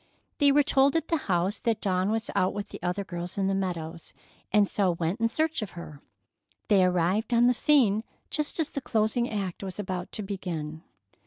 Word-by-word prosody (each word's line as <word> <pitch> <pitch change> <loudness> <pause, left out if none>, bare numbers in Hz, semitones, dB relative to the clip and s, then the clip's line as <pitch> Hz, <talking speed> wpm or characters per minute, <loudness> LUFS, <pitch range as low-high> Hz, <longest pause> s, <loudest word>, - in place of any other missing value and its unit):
They 285 -1 +6
were 290 +1 +5
told 275 +1 +3
at 325 0 0
the 330 - +2
house 180 +3 +1
that 225 -2 0
Dawn 185 -1 0
was 225 +1 -1
out 185 +1 +1
with 205 0 -4
the - - -9
other 180 +3 -1
girls 175 -1 -5
in 195 - +1
the 195 - +1
meadows, 170 -4 -4 0.4
and 210 -1 +4
so 195 -2 +1
went 170 +5 -2
in 230 0 +2
search 315 +3 0
of 200 -4 -7
her. 150 -4 -9 0.7
They 200 -3 +5
arrived 185 +6 +1
on 235 +1 +5
the 250 - +5
scene 235 -6 +3 0.3
just 300 +2 -1
as 315 - +1
the 280 - -4
closing 225 +1 0
act 195 -4 -3
was 190 -2 -6
about 185 -3 -4
to 215 - -4
begin. 170 -6 -5
200 Hz, 200 wpm, -27 LUFS, 180-235 Hz, 0.7 s, They